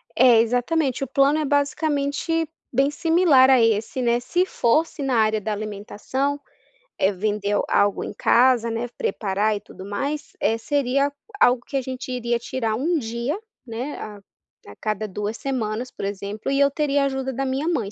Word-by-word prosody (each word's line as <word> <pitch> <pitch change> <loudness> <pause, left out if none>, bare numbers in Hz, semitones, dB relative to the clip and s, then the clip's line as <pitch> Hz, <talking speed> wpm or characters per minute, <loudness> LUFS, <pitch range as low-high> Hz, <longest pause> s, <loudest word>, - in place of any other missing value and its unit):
É, 240 -2 +6
exatamente, 255 +4 0
o - - -3
plano 275 +3 +3
é 305 - -1
basicamente 290 +2 0 0.2
bem 270 +3 +2
similar 320 -5 +4
a 260 -2 +6
esse, 225 +3 +1
né. 240 -1 +2
Se 355 +9 0
fosse 305 +2 +1
na 265 -3 0
área 215 -1 +3
da 215 - -3
alimentação, 215 +7 -3 0.6
eh, 195 - +3
vender 205 +1 -1
algo 205 0 +2
em - - -6
casa, 240 +1 +3
né. 230 +2 -2
Preparar 205 +1 0
e - - -4
tudo 190 -3 -12
mais, 280 +9 -3
eh, 225 +2 +1
seria 275 +2 0 0.3
algo 245 -1 +4
que 275 - -2
a - - 0
gente 255 0 -6
iria 240 -1 -1
tirar 230 -3 -2
1 325 +9 0
dia, 235 - -3 0.3
né. 245 +5 -5
A 210 -2 -8 0.6
cada 215 0 -2
2 210 +2 -4
semanas, 250 -3 -3
por - - -6
exemplo, 200 +3 -4
e 275 0 +1
eu 280 0 +4
teria 285 -2 +1
ajuda 265 -1 -2
da 270 +2 -2
minha 270 +4 -1
mãe. 235 -13 -1
250 Hz, 170 wpm, -23 LUFS, 215-280 Hz, 0.6 s, É